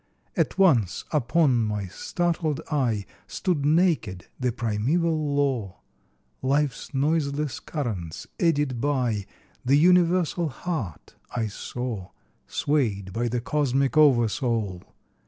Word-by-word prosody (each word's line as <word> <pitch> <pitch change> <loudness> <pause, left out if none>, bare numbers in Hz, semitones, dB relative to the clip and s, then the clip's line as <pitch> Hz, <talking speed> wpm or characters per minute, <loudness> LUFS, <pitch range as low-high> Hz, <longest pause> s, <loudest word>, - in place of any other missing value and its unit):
At - - 0
once 125 - +3
upon 150 -1 +3
my 105 -2 -2
startled 165 - -1
eye, 120 -9 0 0.2
Stood 175 -7 -1
naked 150 - +2
the 125 -1 +1
primeval 145 +7 0
law, 130 -10 0 0.6
Life's 140 0 0
noiseless 145 0 0
currents 105 - -4
eddied 145 -8 +1
by, 125 -8 0 0.4
The 130 +3 +4
universal 175 0 +3
heart 125 - -5 0.2
I 115 -2 0
saw, 110 -1 -5 0.4
Swayed 105 -10 0
by 120 +3 0
the 120 0 -1
cosmic 140 0 +1
oversoul. 115 -8 +3
135 Hz, 100 wpm, -25 LUFS, 115-155 Hz, 0.6 s, The